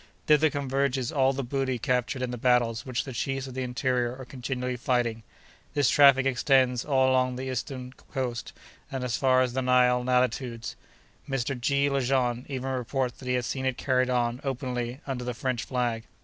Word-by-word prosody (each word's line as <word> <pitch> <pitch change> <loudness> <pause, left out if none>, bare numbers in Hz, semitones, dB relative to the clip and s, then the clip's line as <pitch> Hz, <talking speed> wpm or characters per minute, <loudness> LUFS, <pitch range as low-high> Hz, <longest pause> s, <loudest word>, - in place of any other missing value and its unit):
Thither 155 +1 +5
converges 135 -3 -1
all 135 -2 +3
the 135 0 -3
booty 130 0 -1
captured 125 +1 -1
in 125 - -2
the - - -3
battles 120 -1 +2
which 125 -2 -1
the 135 - -7
chiefs 135 +2 -2
of 130 - -8
the 130 - -3
interior 125 -1 -1
are 130 - -8
continually 125 0 -4
fighting. 120 -2 0 0.5
This 145 -3 +3
traffic 140 -2 +6
extends 130 -1 +3
along 130 -2 +2
the 130 - -5
whole 130 - -3
eastern 130 +1 -5 0.2
coast, 125 -3 -3 0.4
and 135 -1 -3
as 120 -3 -1
far 130 -1 +3
as 125 -1 -2
the 130 - 0
Nile 125 -1 +3
latitudes. 125 -1 0 0.5
Mr. 135 0 -1
G. 140 +3 +2
Lejean 130 -3 0
even 135 -1 -3
reports 130 0 -2
that 130 - -9
he 125 - +1
has 125 -1 -1
seen 130 +1 -2
it 130 - -1
carried 130 -1 +1
on, 120 0 0
openly, 125 -1 -3
under 130 -3 -3
the 125 -1 -4
French 125 -1 -2
flag. 120 -3 -1
130 Hz, 185 wpm, -27 LUFS, 125-135 Hz, 0.5 s, traffic